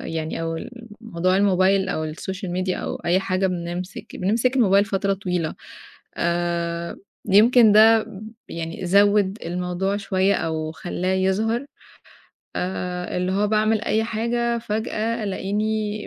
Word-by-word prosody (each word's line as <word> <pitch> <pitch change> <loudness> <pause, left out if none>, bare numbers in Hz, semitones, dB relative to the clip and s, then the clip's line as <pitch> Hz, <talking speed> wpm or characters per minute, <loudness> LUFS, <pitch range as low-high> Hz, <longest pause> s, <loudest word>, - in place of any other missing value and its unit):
يعني 160 0 -4
أو 165 0 -2 0.4
الموضوع 185 -5 0
الموبايل 190 -1 +3
أو 155 -5 -2
الsocial 190 +4 -6
media 185 - -2
أو - - -4
أي 175 +2 +3
حاجة 190 0 0
بنمسِك 180 0 -5
بنمسك 230 +7 +1
الموبايل 200 -4 +4
فترة 195 -1 0
طويلة. 180 -4 -2 0.6
آآ 170 0 -2 0.3
يمكن 220 +3 +6
ده 220 +1 +6 0.4
يعني 165 +2 -5
زوِّد 200 +2 +3
الموضوع 180 +3 -2
شوية 195 -1 +1
أو 155 -1 -2
خلّاه 180 +2 -3
يظهر. 215 +7 0 0.9
آآ 180 -1 -3
اللي 180 +1 0
هو 205 +2 +1
باعمل 215 0 +2
أي 220 0 +1
حاجة 235 +1 -1
فجأة 220 0 -2
ألاقيني 210 +2 -2
190 Hz, 125 wpm, -23 LUFS, 180-215 Hz, 0.9 s, يمكن